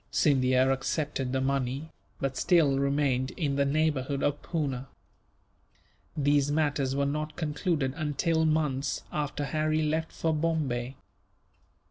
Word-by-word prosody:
Scindia 130 -2 +3
accepted 135 -1 -1
the 130 0 0
money, 135 +3 -1 0.3
but 135 -1 -2
still 155 -6 +3
remained 140 -2 +1
in 145 -5 0
the 140 0 +2
neighbourhood 140 -2 0
of 145 0 0
Poona. 135 -6 -3 1.3
These 145 -1 +3
matters 145 -3 +1
were 140 0 +1
not 150 +2 -2
concluded 150 -3 -1
until 160 +1 0
months 150 -3 0
after 145 -1 -2
Harry 155 +2 0
left 160 +1 -1
for 160 -1 -1
Bombay. 145 -6 -1
145 Hz, 120 wpm, -28 LUFS, 135-155 Hz, 1.3 s, Scindia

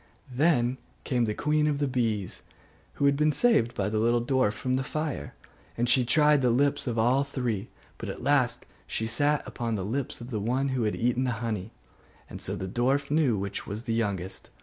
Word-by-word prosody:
Then 130 -3 +2 0.2
came 125 -3 +1
the 105 -1 -2
queen 150 0 +1
of 150 -2 +1
the 145 0 0
bees, 115 -7 -1 0.5
who 140 - 0
had 140 0 +4
been 150 +2 +3
saved 135 - +3
by 100 - 0
the 110 +1 0
little 120 +1 +2
dwarf 130 -5 +2
from 130 +3 -1
the 135 - 0
fire, 145 - -4 0.4
and 120 +1 +1
she 125 +1 +4
tried 150 +3 +4
the 125 - +3
lips 140 +4 +1
of 120 -2 -1
all 125 +5 +3
three; 120 -7 -3 0.3
but - - -5
at - - -6
last 140 -3 +2 0.2
she 110 - -2
sat 145 +6 +1
upon 115 -2 -3
the 95 -3 -3
lips 130 +6 -3
of 120 +2 -9
the 110 - -1
one 130 +6 0
that 120 -3 0
had 105 - 0
eaten 125 +2 +1
the 125 - 0
honey: 110 -3 -3 0.6
and - - -8
so - - -3
the 95 - -4
dwarf 135 +7 0
knew 145 -8 +3
which 100 0 -4
was 105 +3 -5
the 115 - -2
youngest. 100 -5 -2
120 Hz, 210 wpm, -28 LUFS, 110-140 Hz, 0.6 s, had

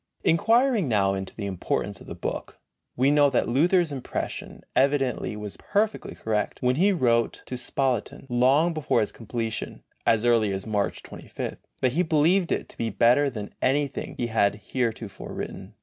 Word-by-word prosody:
Inquiring 225 - +3
now 100 -4 +2
into 95 -1 -5
the 105 - -4
importance 95 -3 -2
of - - -13
the - - -6
book, - - -5 0.4
we 130 +3 +3
note 145 -2 +4
that - - +2
Luther's 170 +6 +3
impression 135 -3 -5
evidently 135 -7 +1
was 105 -1 -7
perfectly 210 +1 -1
correct, 105 -1 -2
when 125 +1 +1
he 195 +5 +4
wrote 115 - +1
to 130 - -5
Spalatin, 125 -1 -2
long 135 +7 +3
before 155 -8 +1
its - - -4
completion 115 -1 -4 0.2
as 115 0 +3
early 115 -4 +3
as 95 0 -3
March 105 -2 -1
2 - - -10
5. - - -4 0.2
that 130 - +3
he 165 +8 +1
believed 170 +3 +3
it - - -1
to - - -11
be 115 - 0
better 120 +7 +4
than 105 -5 -7
anything 140 +1 0
he 120 - -1
had 105 -3 +2
heretofore 115 -1 -4
written. - - -7
125 Hz, 170 wpm, -26 LUFS, 110-150 Hz, 0.4 s, note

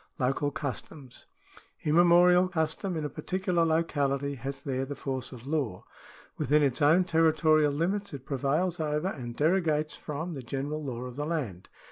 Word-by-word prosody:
Local 135 +2 0
customs. 140 -1 -7 0.3
— - - -25
Immemorial 175 +3 +5
custom 170 +1 -2
in 155 - -2
a - - 0
particular 185 -1 -1
locality 145 -4 0
has 135 +1 -6
there 135 -2 -2
the 140 +1 -5
force 130 -2 -4
of 125 -2 -10
law. 135 -11 -2 0.5
Within 150 +3 +3
its 140 +1 +1
own 160 +6 +5
territorial 155 -3 +3
limits 190 +7 -1
it 135 -2 -8
prevails 150 +7 0
over, 155 +3 0
and 120 -9 -6
derogates 155 -2 +1
from, 160 +4 -5
the 135 - -6
general 140 +5 -4
law 125 -4 -4
of 125 0 -7
the 145 - -2
land. 125 - -4
150 Hz, 160 wpm, -29 LUFS, 135-165 Hz, 0.5 s, Immemorial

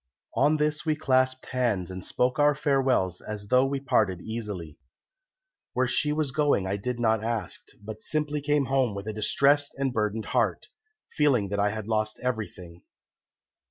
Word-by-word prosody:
"On 155 +1 +3
this 150 0 0
we 155 -2 +1
clasped 130 -3 +1
hands 115 -9 0
and 95 0 -7
spoke 125 +3 0
our 145 0 +5
farewells 135 - +1
as 105 -1 -7
though 125 0 +5
we 140 0 -2
parted 110 -9 +1
easily. 105 -9 -6 0.9
Where 130 - +2
she 150 +4 +1
was 150 -2 -1
going 145 -9 +2
I 95 +1 -1
did 120 +4 -3
not 110 -2 +2
ask, 115 -5 -3 0.2
but 110 +1 -9
simply 150 +2 -1
came 145 -1 +1
home 130 -5 +1
with 100 0 -6
a 110 - -4
distressed 140 +7 +2
and 135 -2 -1
burdened 110 -1 -1
heart, - - 0 0.4
feeling 130 -10 +2
that 100 +1 -2
I 100 0 +3
had 110 0 -5
lost 110 -1 -1
everything. 95 -8 -4
120 Hz, 165 wpm, -27 LUFS, 105-140 Hz, 0.9 s, our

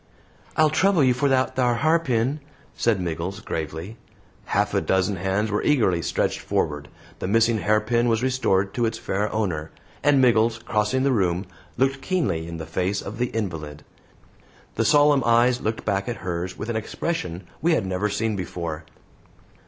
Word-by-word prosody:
"I'll 155 -1 +4
trouble 185 -1 +3
you 130 -1 +4
for 140 +3 +1
that 130 -1 +1
thar 125 -2 +2
harpin," 140 -2 +1 0.3
said 115 -4 +1
Miggles, 90 +3 -3
gravely. 80 +2 -5 0.5
Half - - 0
a - - +2
dozen 95 +1 +1
hands 95 +4 -1
were 105 - 0
eagerly 110 - +2
stretched 75 - -1
forward; 75 -1 -2 0.3
the - - -3
missing 115 +2 +3
hairpin 110 +4 +2
was 115 0 +1
restored 100 -7 +1
to 120 -2 +1
its 115 0 -3
fair 105 0 -2
owner; 85 -8 -2 0.3
and 145 -1 +4
Miggles, 115 -2 +4
crossing 115 +3 0
the 140 - +3
room, 95 -5 +1 0.3
looked 135 +2 +1
keenly 115 - -1
in 85 0 -6
the 80 - -6
face 95 +4 -2
of 110 +4 -7
the 125 - +1
invalid. 80 -10 -5 0.9
The 115 - 0
solemn 145 -1 +5
eyes 120 +2 +3
looked 110 +1 -3
back 100 +1 -1
at 120 - -2
hers 90 0 -3
with 110 - -5
an 120 - -2
expression 110 - -3 0.2
we 165 +3 +3
had 130 - +1
never 95 +2 -1
seen 110 +1 -1
before. 85 -4 -5
110 Hz, 170 wpm, -24 LUFS, 95-125 Hz, 0.9 s, solemn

